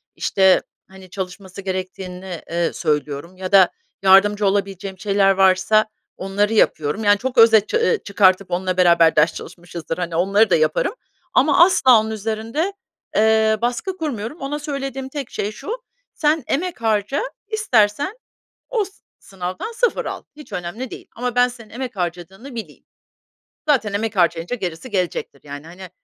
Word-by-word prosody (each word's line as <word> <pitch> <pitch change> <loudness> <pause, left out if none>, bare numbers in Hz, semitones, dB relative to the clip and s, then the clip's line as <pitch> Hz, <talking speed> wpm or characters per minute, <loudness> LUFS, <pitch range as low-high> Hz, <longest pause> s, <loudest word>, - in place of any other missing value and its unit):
işte, 190 -1 +3 0.3
hani, 190 -1 -14
çalışması 190 0 -7
gerektiğini, 185 -1 -5
eee, 170 0 -1
söylüyorum 150 +2 -2
ya 185 -1 -5
da 190 -3 +6 0.3
yardımcı 200 +2 +5
olabileceğim 195 -1 -2
şeyler 200 -1 +3
varsa 195 +3 +4 0.3
onları 200 +3 0
yapıyorum. 160 -2 +1
Yani, 205 0 +5
çok 255 +3 -4
özet 225 -2 +6
ça 455 - +1
eee, 460 -2 +2
çıkartıp 195 -1 +2
onunla 185 +1 -1
beraber 170 -2 +5
ders 155 +2 +4
çalışmışızdır, 170 -2 -7
hani, 175 -2 -3
onları 195 +5 +3
da 175 - +4
yaparım 155 - +1 0.4
ama 290 +5 +6
asla 260 -10 +5
onun 220 0 -3
üzerinde, 225 - -2 0.4
eee, 220 0 +3
baskı 250 +11 -2
kurmuyorum. 265 -3 -5
Ona 290 +2 -3
söylediğim 270 -2 -5
tek 275 -3 -6
şey 205 - -3
şu: 215 - -10 0.4
“Sen 305 0 +1
emek 345 -1 -2
harca, 220 - 0 0.3
istersen 290 - +1 0.5
o 445 -5 0
s 390 - -14 0.3
sınavdan 185 - -6
0 485 0 0
al. - - -5
Hiç 300 - -13
önemli 195 +9 -5
değil. - - -10
Ama 245 +1 -3
ben 245 0 +5
senin 235 -3 -12
emek 245 -1 -6
harcadığını 185 +8 -5
bileyim.” 225 - -8 0.9
Zaten 245 -8 +2
emek 210 +1 -2
harcayınca 170 +4 +1
gerisi 180 +2 -5
gelecektir, 180 -7 -2
yani. 145 +1 -9
Hani, 180 +2 -11
205 Hz, 150 wpm, -20 LUFS, 185-245 Hz, 0.9 s, da